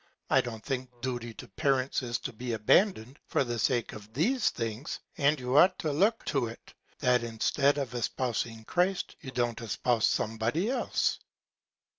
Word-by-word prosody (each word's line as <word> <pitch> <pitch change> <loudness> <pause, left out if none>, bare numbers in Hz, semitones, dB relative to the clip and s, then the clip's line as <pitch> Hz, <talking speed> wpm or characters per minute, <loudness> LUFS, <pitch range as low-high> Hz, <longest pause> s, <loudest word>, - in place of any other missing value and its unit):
I - - +6
don't 115 -3 -7
think 130 -2 -2
Duty 120 -2 -3
to - - -9
Parents 135 +6 0
is 120 -1 -2
to - - -5
be 120 +2 -4
abandon'd 125 - +2
for - - +2
the 120 -2 -3
Sake 120 -1 +1
of 105 0 -11
these 230 - +2
Things; 115 +5 -4 0.2
and 145 +1 +3
you 125 +1 -2
ought 185 +1 +6
to 155 - -1
look 205 +10 +2
to 135 -5 0
it, 115 - -11 0.3
that 125 -1 +3
instead 135 +5 +1
of 135 -4 -3
espousing 115 -2 -2
Christ, 180 +5 0
you 135 - -7
don't 120 -2 -1
espouse 115 +1 +1
some 110 +1 -1
Body 155 - +1
else. 260 - 0
125 Hz, 170 wpm, -29 LUFS, 115-145 Hz, 0.3 s, I